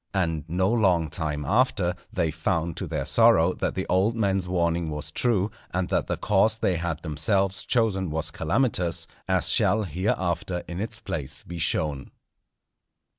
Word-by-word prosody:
And 80 -5 0
no 90 +3 +1
long 95 -8 +2
time 75 -2 -3
after, 100 - +2 0.2
they 80 - 0
found 85 0 -1
to - - -4
their - - -3
sorrow 85 +3 +5
that - - -3
the 95 - -2
old 95 +5 +1
man's 95 -4 0
warning 85 -2 0
was 75 0 -5
true, 105 0 +1 0.2
and 90 0 -2
that - - 0
the - - -2
course 105 +2 +2
they 95 -5 0
had 85 -1 -3
themselves 95 +5 0
chosen 105 -7 +1
was 80 +1 0
calamitous; 85 0 0 0.2
as - - +2
shall, 110 +3 +4
hereafter, 90 0 -2
in 85 +1 -5
its 110 0 -3
place 75 -10 -5
be 85 0 -7
shown. 75 -4 0
90 Hz, 160 wpm, -25 LUFS, 80-100 Hz, 0.2 s, sorrow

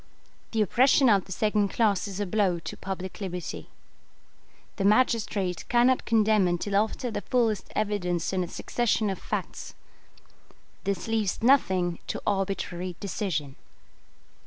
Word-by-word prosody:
The 220 -2 +1
oppression 260 +5 +4
of 200 -4 +3
the - - -13
second 210 +2 +1
class 210 -3 +1
is 195 0 -6
a 205 - 0
blow 190 -2 +1
to 165 - -7
public 190 +1 -6
liberty. 180 -2 -5 1.1
The 200 - -1
magistrate 205 -5 +2
cannot 245 +2 +3
condemn 215 -3 +3
until 175 +3 -1
after 220 +4 0
the 215 - -3
fullest 225 -4 0
evidence 190 -5 -1
and 185 -1 +1
a - - -5
succession 220 +1 0
of 190 - -5
facts. - - -5 1.1
This 195 0 -2
leaves 220 -2 -1
nothing 190 -10 +3
to - - -3
arbitrary 185 -2 -2
decision. 175 -9 -3
200 Hz, 135 wpm, -27 LUFS, 185-220 Hz, 1.1 s, oppression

